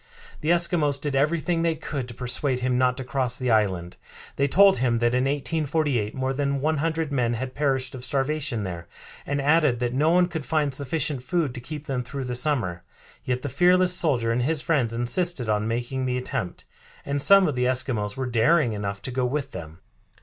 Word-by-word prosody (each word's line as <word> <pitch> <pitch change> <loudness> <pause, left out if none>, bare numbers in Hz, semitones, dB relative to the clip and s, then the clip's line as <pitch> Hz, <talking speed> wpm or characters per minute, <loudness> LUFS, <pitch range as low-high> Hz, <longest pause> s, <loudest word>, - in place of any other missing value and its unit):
The 155 - -3
Eskimos 170 -5 +2
did 145 -1 -3
everything 165 +4 +1
they 165 -1 +1
could 145 -4 -5
to 120 - -9
persuade 125 +1 -1
him 125 0 0
not 125 0 +2
to 135 - -4
cross 130 -1 -1
to - - -7
the 125 - +1
island. 95 -5 0 0.4
They 140 - +1
told 195 +5 +5
him 120 -1 +1
that 120 +1 +1
in 125 +1 +2
1848 145 -5 -1
more 130 0 -1
than 140 0 -1
one 155 +3 0
hundred 160 0 -1
men 120 -4 +1
had 130 +2 -5
perished 135 -3 -1
of 125 -2 -8
starvation 135 -4 -1
there, 85 -3 -6 0.4
and 140 0 -1
added 150 -2 +3
that 120 0 -2
no 150 +5 +2
one 180 +1 +4
could 160 -4 -5
find 150 -2 0
sufficient 140 0 -2
food 145 +1 -1
to 120 - -7
keep 150 +3 -7
them 135 -4 -2
through 135 +2 -6
the 125 -1 -4
summer. 120 - -1 0.4
Yet 125 0 -2
the - - -2
fearless 180 +6 +4
soldier 125 -10 +1
and 120 +2 0
his 155 +5 0
friends 140 -7 +1
insisted 120 +2 -1
on 105 0 0
making 120 +3 -2
the 125 0 -1
attempt, 110 -7 -4 0.4
and 140 0 -1
some 195 +4 +6
of 150 - 0
the 125 -1 0
Eskimos 125 -5 0
were 130 - -2
daring 125 +2 +3
enough 100 -1 -4
to 130 - -3
go 125 0 0
with 140 +1 -3
them. 80 -1 -9
130 Hz, 210 wpm, -25 LUFS, 120-150 Hz, 0.4 s, some